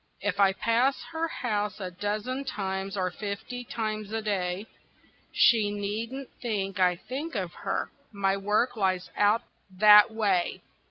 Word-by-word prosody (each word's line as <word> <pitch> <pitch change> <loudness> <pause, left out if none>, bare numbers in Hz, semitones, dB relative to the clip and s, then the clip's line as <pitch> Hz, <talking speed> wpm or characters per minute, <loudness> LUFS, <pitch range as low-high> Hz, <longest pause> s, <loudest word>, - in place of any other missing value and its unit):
If 200 -1 -2
I 195 -1 +6
pass 235 +7 +2
her 325 0 -1
house 210 -8 -2
a 185 -2 -5
dozen 210 +8 -3
times, 195 -4 -3
or 185 -1 0
fifty 210 +6 -5
times 215 -3 -4
a 225 - -1
day, 195 -2 -2 0.7
She 220 -4 +4
needn't 220 +6 -4
think 195 -5 -2
I 180 -1 +4
think 270 - -6
of 185 -4 -3
her, 195 - -3 0.2
my 195 -2 +1
work 210 +5 +1
lies 185 -3 0
out 205 +2 +3 0.3
that 210 +1 +8
way. 205 -6 0
205 Hz, 145 wpm, -28 LUFS, 195-230 Hz, 0.7 s, that